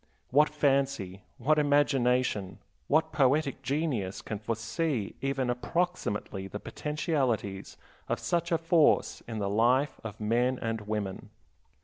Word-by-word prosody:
What 150 +4 +5
fancy, 135 -10 0 0.2
what 150 +5 +2
imagination, 130 -9 +2 0.3
what 160 +2 +2
poetic 140 -1 +2
genius 135 - -2
can 110 -2 -4
foresee 115 +2 -2
even 135 -1 0
approximately 120 - -2
the 105 +2 -6
potentialities 130 - -2 0.3
of - - +1
such 170 0 -1
a 165 - +4
force 165 -1 +3
in 115 -1 -5
the 100 -2 -1
life 120 +8 +2
of 110 -1 -7
men 120 +4 +1
and 115 -1 -2
women. 105 -2 -4
130 Hz, 120 wpm, -29 LUFS, 105-150 Hz, 0.3 s, What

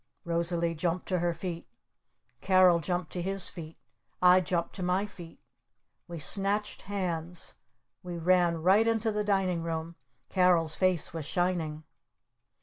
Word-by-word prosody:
Rosalee 170 0 0
jumped 170 +2 -2
to 185 -2 +1
her 175 0 +1
feet. 170 0 -6 0.7
Carol 185 -2 +5
jumped 175 0 -3
to 180 - -3
his 195 +1 0
feet. 160 -2 -10 0.4
I 180 +1 +6
jumped 170 -1 -2
to - - -5
my 180 +3 +1
feet. 175 -5 -12 0.7
We 170 - -7
snatched 200 +7 0
hands. 175 -4 -4 0.5
We 175 -1 -6
ran 170 -1 +2
right 200 +5 +4
into 225 -1 +1
the 210 0 -1
Dining 190 -4 0
Room. 165 0 -4 0.3
Carol's 175 -4 +3
face 185 -2 0
was 160 -3 -5
shining. 170 -4 -1
175 Hz, 140 wpm, -29 LUFS, 165-185 Hz, 0.7 s, I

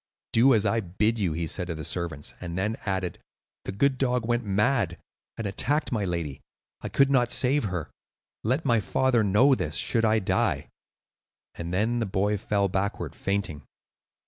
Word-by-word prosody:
"Do 125 +3 +6
as 110 -1 +2
I 115 +3 +2
bid 105 +4 0
you," 90 -6 0
he 85 +1 -2
said 90 +3 -3
to 85 - -3
the 80 -1 -6
servants, 80 -4 -3
and 85 -1 -5
then 105 +4 0
added, 95 -2 -2 0.5
"The - - -3
good 130 +6 +1
dog 125 -3 +1
went 120 0 +1
mad, 105 -2 +1 0.4
and 115 - -4
attacked 145 +10 0
my 110 -5 0
lady. 85 -6 -3 0.4
I - - -4
could 140 0 +3
not 125 -3 +3
save 135 0 +2
her. 90 -6 -4 0.5
Let 130 +8 0
my 120 -4 +4
father 125 +2 +2
know 105 +8 +5
this, 85 - -1
should 115 -2 +1
I 110 0 +4
die;" 100 - 0 0.8
and 85 0 -6
then 110 +6 +1
the 115 - -1
boy 100 +2 0
fell 100 -1 +1
backward, 95 +2 -2
fainting. 100 -7 -2
105 Hz, 175 wpm, -27 LUFS, 90-120 Hz, 0.8 s, Do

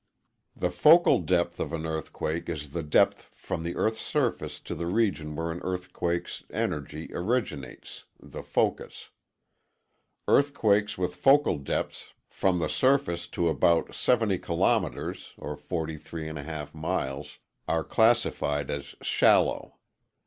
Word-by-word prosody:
] - - -50
The 90 - -1
focal 155 - +6
depth 85 0 0
of - - -3
an 80 -1 -3
earthquake 80 +1 -3
is 75 -4 -5
the 85 - -3
depth 75 -1 +2
from - - -4
the 85 +1 -4
EarthŌĆÖs 110 0 0
surface - - -1
to - - -6
the 85 +2 -4
region 85 -7 0
where 80 +2 -2
an 85 - -5
earthquakeŌĆÖs 90 -1 -3
energy 75 +2 -3
originates 90 - -3
(the - - -9
focus). - - -2 1.2
Earthquakes 105 -8 +3
with 90 -1 -1
focal 135 - +4
depths 70 - -4 0.2
from 95 -2 +1
the 85 - 0
surface 130 -10 +1
to 85 - -1
about 85 +1 +2
70 110 -7 +2
kilometers 85 +3 -1
(43.5 80 0 -5
miles) 75 -4 -3 0.3
are 80 -1 +1
classified 110 - +2
as 70 0 -5
shallow. - - +3
85 Hz, 120 wpm, -27 LUFS, 75-95 Hz, 1.2 s, focal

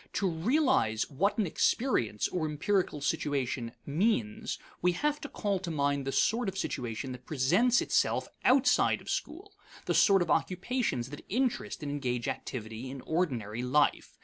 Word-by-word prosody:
To 195 - +1
realize 175 - +1
what 195 - +1
an 215 - +2
experience, 155 - +1
or 165 -4 -1
empirical 155 +1 0
situation, 130 -5 -1
means, 145 - 0 0.2
we 180 0 +3
have 295 +10 -1
to 290 - -6
call 200 -3 -1
to 180 -1 -5
mind 140 -3 0
the - - 0
sort 225 - +2
of 190 - -7
situation 120 - -3
that 125 0 -10
presents 180 - +3
itself - - +1 0.2
outside 255 -1 +4
of - - -6
school; 395 +5 -4 0.3
the - - 0
sort 195 -3 +5
of - - -3
occupations 185 - 0
that 145 - -8
interest 245 - -1
and 145 - -3
engage 125 -4 -2
activity 115 0 -5
in 135 0 -7
ordinary 125 - -2
life. 140 +4 +1
155 Hz, 155 wpm, -30 LUFS, 130-210 Hz, 0.3 s, sort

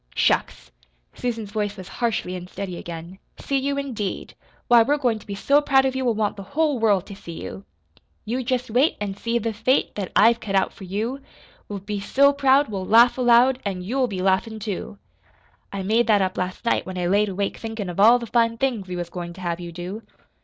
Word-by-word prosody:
"Shucks!" - - 0 0.4
Susan's 225 -4 -4
voice 205 -1 -2
was 185 -1 -9
harshly 225 -6 -2
unsteady 180 +1 -6
again. 170 +2 -8 0.2
"See 275 -1 -1
you, 280 +1 -1
indeed! 240 -8 -4 0.3
Why, 240 -1 +7
we're 285 +6 +2
goin' 245 -6 0
to - - -18
be 200 - -4
so 280 +8 +3
proud 270 -2 +3
of 265 0 0
you 265 - -1
we'll 240 -3 +1
want 210 -1 -1
the - - -6 0.2
whole 305 -5 +2
world 205 -5 +2
to 200 - -9
see 170 -4 -9
you. 195 - -8 0.6
You 245 +4 -2
jest 250 -2 -2
wait 260 +8 +3
An' 205 -1 -3
see 230 +3 -1
the 230 -1 -2
fate 230 +5 +1
That 195 -3 -5
I've 230 +2 +5
cut 200 -4 -4
out 190 - +2
for 190 - -11
you. 220 +8 -3 0.5
We'll 200 -2 -5
be 205 +1 -4
so 280 +8 +3
proud 275 0 +4
We'll 195 -3 -4
laugh 230 +5 +6
aloud, 250 +1 +5
An' 190 -3 -3
you'll 255 +6 0
be 190 -4 -4
laughin', 195 +4 +1
too! 200 - -5 0.7
I 195 -1 -4
made 225 +5 +2
that 205 -3 +4
up 185 0 -2
last 180 +5 -4
night 230 - +2
when 185 0 -7
I 180 - -1
laid 205 +3 +2
awake 195 +1 -2
thinkin' 225 -3 -5
of 175 +1 -5
all 230 +4 +7
the 240 - -6
fine 230 0 +1
things 235 -7 -1
we 180 - -5
was 175 -1 -5
goin' 175 -1 -6
to 185 - -12
have 170 -1 -2
you 175 -1 -7
do." 180 +5 -6
210 Hz, 220 wpm, -23 LUFS, 190-245 Hz, 0.7 s, Why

